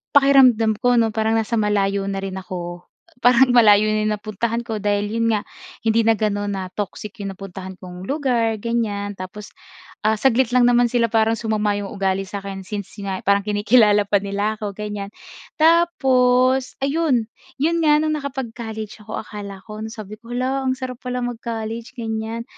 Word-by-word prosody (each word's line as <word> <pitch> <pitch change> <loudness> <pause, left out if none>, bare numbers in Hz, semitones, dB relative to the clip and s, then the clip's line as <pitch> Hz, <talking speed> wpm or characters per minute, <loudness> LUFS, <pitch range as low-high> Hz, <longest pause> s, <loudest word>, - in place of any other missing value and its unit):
pakiramdam 255 -6 +5
ko 245 0 +3
'no 225 -2 +3
parang 220 +1 0
nasa 225 0 0
malayo 200 -1 +1
na 195 0 -3
rin 190 -1 -4
ako. 175 -1 -7 0.3
Parang 250 +1 +5
malayo 215 -4 +6
na 215 - +1
'yong 215 - +1
napuntahan 215 +3 -3
ko 225 -3 -4
dahil 205 0 0
'yon 230 0 0
nga 205 - -1 0.4
hindi 225 0 +2
na 225 - +5
gano'n 205 -1 -1
na 190 - -3
toxic 205 +1 -6
'yong 195 -1 -5
napuntahan 190 -1 -8
kong 180 0 -10
lugar, 245 -6 +1
ganyan. 210 -4 -1
Tapos, 200 +3 -8 0.6
ah, 220 - +3
saglit 245 +2 +2
lang 250 - +5
naman 245 0 +4
sila 235 -1 +1
parang 225 0 +3
sumama 215 -2 0
'yong 205 -1 -4
ugali 195 -1 -1
sa'kin 195 0 -6
since 200 0 -6
nga 190 -1 -3
parang 200 0 +3
kinikilala 210 0 +4
pa 200 -1 +2
nila 200 +2 -1
ako, 205 -2 -3
gan'yan. 210 -1 -5 0.5
Tapos, 260 -6 +3
ayun. 275 -6 +1 0.3
'Yon 335 +3 +1
nga 300 -1 +5
no'ng 310 0 0
nakapag-college 230 -6 -6
ako 215 - -5
akala 200 -2 -8
ko 215 0 -7
na 220 - -5
sabi 215 -2 -8
ko 235 +2 -14
"Hala, 260 +2 -1
ang 260 - +2
sarap 255 -2 -6
pala 250 0 -3
mag-college," 230 -1 -5
ganiyan. 225 0 -3
220 Hz, 175 wpm, -21 LUFS, 205-245 Hz, 0.6 s, malayo